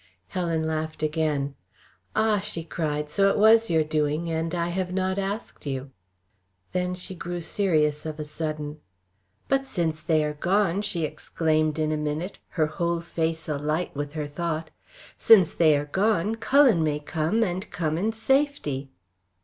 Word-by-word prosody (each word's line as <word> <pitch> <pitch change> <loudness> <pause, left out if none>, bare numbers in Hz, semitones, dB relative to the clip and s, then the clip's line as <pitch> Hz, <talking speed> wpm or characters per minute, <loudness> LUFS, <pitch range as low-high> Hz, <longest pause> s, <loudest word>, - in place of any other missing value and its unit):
Helen 165 -3 -1
laughed 155 0 -3
again. 150 -3 0 0.6
"Ah," 220 -1 +3
she 165 -3 -4
cried! 150 -2 -2
"So 195 +6 +3
it - - +1
was 225 +2 +6
your 160 -2 +3
doing, 155 +2 0
and 165 +1 -1
I 170 0 0
have 180 +1 -2
not 190 +1 0
asked 200 -4 -4
you." 135 0 -4 0.8
Then 180 0 -1
she 180 +1 -6
grew 175 0 -5
serious 155 -5 +1
of 155 -1 -5
a 150 - -3
sudden. 150 0 -4 0.7
"But 270 0 +2
since 165 -11 -2
they 155 -1 +2
are 150 0 -1
gone" 190 +4 +1
she 175 -5 -2
exclaimed, 155 0 0
in 155 -1 0
a 155 - 0
minute, 150 +5 -3 0.2
her 155 - +4
whole 170 +2 -1
face 165 -1 -2
alight 150 +3 -1
with 145 0 -4
her 155 -1 -3
thought 160 +2 -3 0.5
"since 195 -7 +6
they 155 -3 +4
are 145 - -2
gone, 205 +5 +1
Cullen 225 - +4
may 150 -1 0
come 160 +8 0
and 185 -1 -3
come 155 -3 -1
in 205 +7 0
safety." 225 - 0
165 Hz, 160 wpm, -26 LUFS, 150-190 Hz, 0.8 s, was